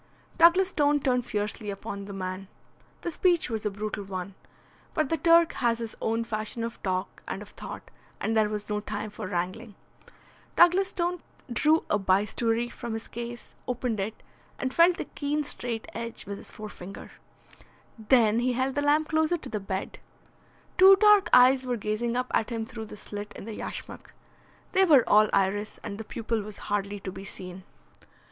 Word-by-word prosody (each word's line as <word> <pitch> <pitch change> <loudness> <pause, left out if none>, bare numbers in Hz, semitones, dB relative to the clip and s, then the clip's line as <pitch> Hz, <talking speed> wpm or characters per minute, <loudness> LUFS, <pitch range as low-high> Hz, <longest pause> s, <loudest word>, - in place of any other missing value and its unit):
Douglas 355 +3 +6
Stone 290 -3 +2
turned 250 -2 +1
fiercely 210 -1 -2
upon 200 0 -6
the 200 - -8
man. 185 0 -5 0.5
The 345 - -3
speech 345 -5 +2
was 220 -1 -1
a - - +1
brutal 210 +1 -4
one. 190 0 -5 0.6
But 310 -4 +1
the 325 - +1
Turk 335 0 +5
has 235 -2 +1
his 230 -2 -5
own 225 +1 0
fashion 220 0 -4
of 230 0 -5
talk 185 0 -3
and - - -4
of - - -12
thought, - - -9 0.3
and 225 - -1
there 215 -1 +3
was 210 -1 -4
no 210 0 -1
time 210 0 -5
for 195 - -6
wrangling. 185 +5 -3 0.8
Douglas 360 +3 +5
Stone 350 -1 -2 0.3
drew 310 +6 +3
a 210 - +1
bistoury 210 +5 +1
from 235 -1 -6
his 225 - -6
case, 240 0 -7
opened 245 -3 -2
it 210 +3 -4 0.3
and 260 -1 -3
felt 340 +1 +5
the - - -3
keen 295 +1 -2
straight 240 -5 -3
edge 230 0 -5
with 200 0 -5
his - - -11
forefinger. 200 -3 -9 0.9
Then 220 -1 +4
he 250 +1 +1
held 260 +2 0
the 290 - 0
lamp 295 +2 +2
closer 315 +2 +2
to - - -8
the 210 - -2
bed. 195 -1 -4 0.8
Two 385 +1 +10
dark 420 0 +5
eyes 255 +1 +7
were 250 -1 -1
gazing 230 +3 -1
up 250 0 -2
at 220 - +1
him 225 -2 -3
through 225 -2 -7
the 210 - -10
slit 205 0 -7
in - - -8
the 225 - -6
yashmak. - - -7 0.6
They 380 0 +4
were 290 -10 +6
all 215 0 +5
iris, 205 +2 0
and 200 - -6
the - - -4
pupil 225 0 -3
was 210 0 -8
hardly 205 0 -2
to 190 - -5
be 190 - -9
seen. 185 -1 -8
225 Hz, 180 wpm, -27 LUFS, 205-270 Hz, 0.9 s, Two